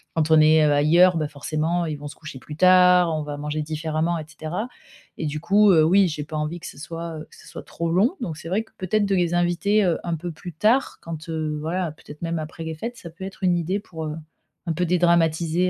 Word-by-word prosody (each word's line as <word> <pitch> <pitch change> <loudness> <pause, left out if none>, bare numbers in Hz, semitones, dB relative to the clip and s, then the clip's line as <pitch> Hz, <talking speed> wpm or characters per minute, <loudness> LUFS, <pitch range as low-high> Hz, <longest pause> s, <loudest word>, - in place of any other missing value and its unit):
quand 160 -1 +1
on 160 - +7
est, 155 0 +5
heu, 150 - +3
ailleurs, 170 +5 +5
bah, 155 - -1
forcément, 155 +4 -2
ils 155 -2 -4
vont 145 - -8
se 145 - -10
coucher 155 -4 -10
plus 150 +3 -9
tard, 180 -1 +5
on 155 - -2
va 145 -1 -5
manger 150 +1 -3
différemment 155 +2 -2
et 155 - -5
cetera 160 +8 -5 0.5
et 155 - -2
du 150 +1 -3
coup, 200 +5 +4
heu, 160 -4 +5
oui 190 +4 +5
j'ai 150 -3 -4
pas 155 +1 -8
envie 150 +3 -3
que 175 - -11
ce - - -11
soit, 165 +1 -6
heu, 155 - -10
que - - -18
ce - - -16
soit - - -8
trop 170 -1 -4
long, 210 - +2
donc 170 -10 -4
c'est 165 - -8
vrai 205 +4 0
que 225 - -26
peut-être 205 +3 +1
de 195 - 0
les 175 -1 +1
inviter, 175 +5 +2
heu, 170 - +1
un 170 -1 -2
peu 170 +2 -5
plus 175 +2 -9
tard 220 - +1
quand, 165 0 -7
heu, 155 -1 -2
voilà 170 +1 -2
peut-être 150 +1 -13
même 165 0 -2
après 155 +2 -7
les 160 0 -4
fêtes, 235 +9 -6
ça 170 - -10
peut 185 +3 -9
être 190 0 -10
une 180 -1 +3
idée 175 +4 -1
pour, 160 -6 -8
heu, 150 - -4 0.5
un 165 - -1
peu 180 +3 0
dédramatiser 170 0 +2
165 Hz, 255 wpm, -23 LUFS, 155-180 Hz, 0.5 s, on